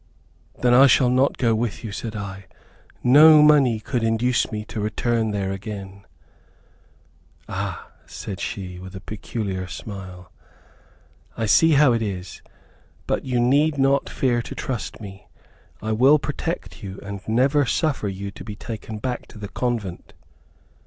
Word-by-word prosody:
"Then 120 Hz, -1 st, +5 dB
I 135 Hz, +3 st, +8 dB
shall 125 Hz, 0 st, +4 dB
not 130 Hz, +2 st, +2 dB
go 115 Hz, -3 st, +2 dB
with 110 Hz, 0 st, -2 dB
you," 110 Hz, -, -5 dB
said 110 Hz, +1 st, -5 dB
I. 95 Hz, -2 st, -6 dB, 0.6 s
"No 150 Hz, +4 st, +8 dB
money 140 Hz, -7 st, +5 dB
could 120 Hz, +2 st, -2 dB
induce 115 Hz, +3 st, +1 dB
me 105 Hz, -1 st, -4 dB
to 110 Hz, -, -6 dB
return 110 Hz, +1 st, 0 dB
there 100 Hz, -2 st, -2 dB
again." 100 Hz, -1 st, -7 dB, 1.4 s
"Ah!" -, -, -4 dB, 0.2 s
said 100 Hz, -, -7 dB
she, 90 Hz, -2 st, -5 dB
with 95 Hz, +1 st, -10 dB
a -, -, -6 dB
peculiar 100 Hz, -2 st, -5 dB
smile, 95 Hz, -3 st, -9 dB, 1.1 s
"I 115 Hz, -, -1 dB
see 160 Hz, +9 st, +5 dB
how 145 Hz, -3 st, +5 dB
it 115 Hz, -, 0 dB
is, 95 Hz, -4 st, -5 dB, 0.6 s
but -, -, -1 dB
you 125 Hz, -2 st, 0 dB
need 145 Hz, +5 st, +3 dB
not 135 Hz, 0 st, +2 dB
fear 120 Hz, -3 st, 0 dB
to -, -, -8 dB
trust 125 Hz, -4 st, -4 dB
me. 95 Hz, -3 st, -11 dB, 0.6 s
I 110 Hz, -, -2 dB
will 130 Hz, +7 st, +5 dB
protect 150 Hz, +2 st, -5 dB
you, 95 Hz, -2 st, -7 dB
and 100 Hz, -1 st, -6 dB
never 135 Hz, +5 st, +2 dB
suffer 145 Hz, -5 st, 0 dB
you 100 Hz, +1 st, -5 dB
to -, -, -11 dB
be 105 Hz, 0 st, -7 dB
taken 110 Hz, -1 st, -7 dB
back 125 Hz, +3 st, -4 dB
to -, -, -14 dB
the 105 Hz, -1 st, -7 dB
convent." 115 Hz, -9 st, -3 dB
110 Hz, 150 wpm, -23 LUFS, 100-130 Hz, 1.4 s, I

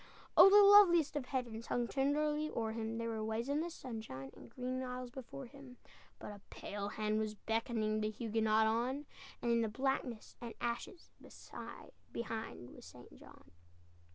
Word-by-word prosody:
Oh, 390 Hz, -, +10 dB
the 410 Hz, +1 st, +8 dB
loveliest 365 Hz, -7 st, +7 dB
of 290 Hz, -3 st, -2 dB
heavens 235 Hz, -4 st, -3 dB
Hung 240 Hz, -1 st, 0 dB
tenderly 300 Hz, +3 st, +1 dB
o'er 225 Hz, -5 st, -2 dB
him, 225 Hz, 0 st, -3 dB
There 230 Hz, 0 st, -2 dB
were 220 Hz, -1 st, -3 dB
waves 220 Hz, +4 st, -2 dB
in 285 Hz, +1 st, +1 dB
the 340 Hz, -, -3 dB
sunshine, 220 Hz, -, -7 dB
And -, -, -13 dB
green 255 Hz, +2 st, -3 dB
isles 250 Hz, -1 st, -5 dB
before 265 Hz, +1 st, -8 dB
him; 265 Hz, -1 st, -13 dB, 0.4 s
But -, -, -8 dB
a 205 Hz, -1 st, -11 dB
pale 200 Hz, 0 st, -5 dB
hand 215 Hz, 0 st, -1 dB
was 215 Hz, -1 st, -2 dB
beckoning 220 Hz, -1 st, -1 dB
The 215 Hz, -, 0 dB
Huguenot 220 Hz, 0 st, +1 dB
on; 245 Hz, +6 st, 0 dB, 0.4 s
And 240 Hz, -, +2 dB
in 230 Hz, -1 st, +2 dB
blackness 260 Hz, -1 st, -2 dB
and 235 Hz, -1 st, -7 dB
ashes 240 Hz, +9 st, -4 dB, 1.0 s
Behind 225 Hz, -, -5 dB
was -, -, -13 dB
St. -, -, -14 dB
John! 75 Hz, -, -16 dB
235 Hz, 160 wpm, -36 LUFS, 220-270 Hz, 1.0 s, Oh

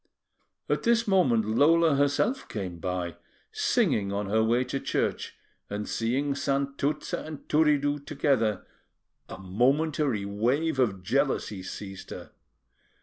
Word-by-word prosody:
At -, -, 0 dB
this 230 Hz, 0 st, +2 dB
moment 135 Hz, -, +3 dB
Lola 155 Hz, +8 st, +4 dB
herself 145 Hz, -, +1 dB
came 95 Hz, -5 st, -5 dB
by, 90 Hz, -2 st, -3 dB, 0.3 s
singing 100 Hz, -2 st, +1 dB
on 100 Hz, 0 st, -3 dB
her 110 Hz, +1 st, +3 dB
way 120 Hz, +3 st, +2 dB
to 135 Hz, -, -3 dB
church, -, -, -2 dB, 0.3 s
and 105 Hz, +1 st, -4 dB
seeing 130 Hz, +5 st, 0 dB
Santuzza 140 Hz, +1 st, -1 dB
and 155 Hz, -2 st, -9 dB
Turiddu 145 Hz, -2 st, +2 dB
together, 115 Hz, -7 st, 0 dB, 0.6 s
a -, -, -7 dB
momentary 125 Hz, -, +1 dB
wave 130 Hz, +9 st, 0 dB
of 100 Hz, -7 st, +1 dB
jealousy 115 Hz, -3 st, 0 dB
seized 95 Hz, 0 st, -8 dB
her. -, -, -9 dB
130 Hz, 120 wpm, -27 LUFS, 105-145 Hz, 0.6 s, Lola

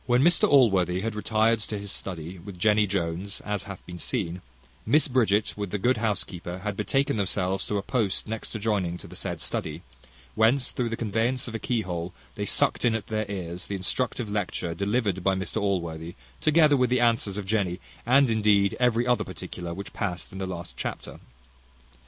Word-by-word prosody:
When 125 Hz, +1 st, +4 dB
Mr 175 Hz, +1 st, +5 dB
Allworthy 95 Hz, -, +4 dB
had 115 Hz, +1 st, -2 dB
retired 110 Hz, +2 st, +2 dB
to 105 Hz, 0 st, -4 dB
his 100 Hz, -1 st, -4 dB
study 90 Hz, -1 st, -5 dB
with 95 Hz, +1 st, -9 dB
Jenny 105 Hz, +3 st, +4 dB
Jones, 95 Hz, +1 st, -2 dB
as 105 Hz, -2 st, -3 dB
hath 100 Hz, -2 st, -9 dB
been 90 Hz, -1 st, -8 dB
seen, 90 Hz, -7 st, -2 dB, 0.5 s
Mrs 150 Hz, -2 st, +4 dB
Bridget, 110 Hz, -5 st, +3 dB
with 100 Hz, -2 st, -3 dB
the 105 Hz, -, -1 dB
good 125 Hz, +6 st, +2 dB
housekeeper, 95 Hz, -5 st, -2 dB
had 105 Hz, -2 st, -2 dB
betaken 135 Hz, +6 st, +1 dB
themselves 95 Hz, -1 st, 0 dB
to 105 Hz, -, 0 dB
a 100 Hz, -, -2 dB
post 105 Hz, -5 st, 0 dB
next 110 Hz, +1 st, -5 dB
adjoining 100 Hz, -5 st, 0 dB
to -, -, -10 dB
the -, -, -11 dB
said -, -, -4 dB
study; 80 Hz, +3 st, -3 dB, 0.5 s
whence, 120 Hz, +4 st, +3 dB
through 120 Hz, -2 st, -1 dB
the 115 Hz, -, -3 dB
conveyance 115 Hz, +4 st, 0 dB
of 115 Hz, -, -6 dB
a 115 Hz, -, -2 dB
keyhole, 90 Hz, -8 st, -2 dB, 0.2 s
they -, -, -3 dB
sucked -, -, +2 dB
in 115 Hz, -2 st, +3 dB
at 110 Hz, -, -3 dB
their 110 Hz, -2 st, -2 dB
ears 90 Hz, -3 st, -5 dB
the 100 Hz, -, -3 dB
instructive 115 Hz, +5 st, -1 dB
lecture 100 Hz, -4 st, -2 dB
delivered 100 Hz, 0 st, 0 dB
by 95 Hz, 0 st, +3 dB
Mr 95 Hz, +3 st, -2 dB
Allworthy, 85 Hz, -4 st, -2 dB, 0.2 s
together 155 Hz, -1 st, +5 dB
with 125 Hz, -2 st, +3 dB
the 125 Hz, 0 st, +3 dB
answers 115 Hz, -4 st, +2 dB
of 105 Hz, -, -3 dB
Jenny, 95 Hz, -3 st, 0 dB, 0.2 s
and 135 Hz, +3 st, +5 dB
indeed 105 Hz, -3 st, +3 dB
every 120 Hz, -1 st, +3 dB
other 125 Hz, -1 st, +2 dB
particular 85 Hz, -1 st, -6 dB
which 100 Hz, +4 st, -7 dB
passed 90 Hz, -5 st, -3 dB
in 95 Hz, -, -7 dB
the 95 Hz, -, -2 dB
last 85 Hz, -1 st, -6 dB
chapter. -, -, -5 dB
105 Hz, 190 wpm, -27 LUFS, 95-115 Hz, 0.5 s, Mr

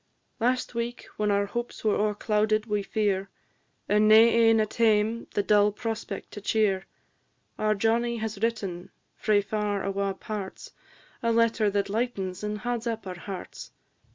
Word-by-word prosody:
Last 250 Hz, +2 st, 0 dB
week, 235 Hz, +1 st, -4 dB
when 210 Hz, 0 st, +1 dB
our 200 Hz, 0 st, +2 dB
hopes 240 Hz, +4 st, -5 dB
were 215 Hz, -2 st, +3 dB
o'erclouded 215 Hz, +1 st, +1 dB
wi' 210 Hz, -2 st, 0 dB
fear, 195 Hz, -1 st, -1 dB, 0.6 s
And 210 Hz, +1 st, +4 dB
nae 215 Hz, -, +8 dB, 0.2 s
ane 225 Hz, -1 st, +5 dB
at 215 Hz, -1 st, -1 dB
hame 225 Hz, 0 st, +2 dB
the 205 Hz, -, +2 dB
dull 210 Hz, 0 st, +4 dB
prospect 225 Hz, +1 st, -5 dB
to 205 Hz, -, -8 dB
cheer; 200 Hz, -2 st, +1 dB, 0.7 s
Our 215 Hz, 0 st, +2 dB
Johnnie 235 Hz, +3 st, +1 dB
has 220 Hz, -2 st, -4 dB
written, 200 Hz, -6 st, -2 dB, 0.3 s
frae 210 Hz, -2 st, +2 dB
far 210 Hz, -1 st, -2 dB
awa' 195 Hz, 0 st, -1 dB
parts, 200 Hz, -2 st, -6 dB, 0.5 s
A 230 Hz, -, +1 dB
letter 230 Hz, -2 st, +3 dB
that 200 Hz, 0 st, 0 dB
lightens 200 Hz, -4 st, -2 dB
and 210 Hz, 0 st, -2 dB
hauds 240 Hz, +1 st, -3 dB
up 225 Hz, -2 st, -3 dB
our 180 Hz, -2 st, -6 dB
hearts. 190 Hz, +1 st, -8 dB
215 Hz, 155 wpm, -27 LUFS, 200-225 Hz, 0.7 s, nae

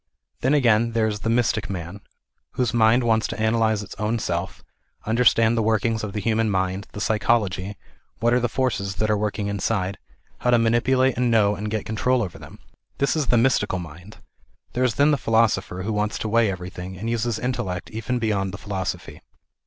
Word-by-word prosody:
Then 135 Hz, +4 st, +2 dB
again 115 Hz, -4 st, +3 dB
there 115 Hz, -1 st, +2 dB
is 105 Hz, -1 st, -2 dB
the 115 Hz, -, -2 dB
mystic 115 Hz, -3 st, +1 dB
man, 90 Hz, +1 st, -6 dB, 0.5 s
whose 125 Hz, -2 st, 0 dB
mind 115 Hz, +2 st, +4 dB
wants 110 Hz, -1 st, +2 dB
to -, -, -6 dB
analyse 110 Hz, -1 st, +1 dB
its -, -, -10 dB
own 110 Hz, +2 st, 0 dB
self, 90 Hz, -3 st, -3 dB, 0.4 s
understand 115 Hz, 0 st, +3 dB
the 115 Hz, -, +1 dB
work 110 Hz, 0 st, +1 dB
ings 115 Hz, -1 st, 0 dB
of 105 Hz, -2 st, -4 dB
the 105 Hz, -, -2 dB
human 110 Hz, +1 st, +1 dB
mind, 95 Hz, 0 st, -1 dB
the -, -, -6 dB
psychology, 105 Hz, -3 st, 0 dB, 0.4 s
what 120 Hz, +2 st, +2 dB
are 125 Hz, -, +4 dB
the 120 Hz, -1 st, 0 dB
forces 115 Hz, -7 st, -1 dB
that 110 Hz, +2 st, 0 dB
are -, -, +3 dB
working 105 Hz, 0 st, -2 dB
inside, 100 Hz, -1 st, -1 dB, 0.4 s
how 125 Hz, -, 0 dB
to 120 Hz, -, +5 dB
manipulate 120 Hz, +3 st, +2 dB
and 125 Hz, -1 st, +2 dB
know 105 Hz, -3 st, +4 dB
and 105 Hz, +1 st, -4 dB
get 110 Hz, 0 st, -3 dB
control 120 Hz, +3 st, +1 dB
over 90 Hz, -5 st, -7 dB
them. -, -, -12 dB, 0.4 s
This 140 Hz, -, +1 dB
is 150 Hz, -4 st, 0 dB
the 120 Hz, -, +3 dB
mystical 115 Hz, -5 st, +2 dB
mind. 90 Hz, +4 st, -10 dB, 0.6 s
There 125 Hz, -, 0 dB
is 125 Hz, -3 st, +1 dB
then 145 Hz, +2 st, +4 dB
the 145 Hz, -, +2 dB
philosopher, 110 Hz, -6 st, +1 dB
who 110 Hz, +3 st, -2 dB
wants 105 Hz, 0 st, -1 dB
to -, -, -3 dB
weigh 115 Hz, 0 st, +3 dB
everything, 90 Hz, 0 st, -6 dB
and 110 Hz, +5 st, -5 dB
use 115 Hz, -1 st, 0 dB
his 120 Hz, -1 st, -1 dB
intellect 120 Hz, -8 st, -3 dB
even 115 Hz, +3 st, -2 dB
beyond 100 Hz, -4 st, -1 dB
the -, -, -7 dB
philosophy. 95 Hz, -2 st, -5 dB
110 Hz, 200 wpm, -23 LUFS, 100-120 Hz, 0.6 s, to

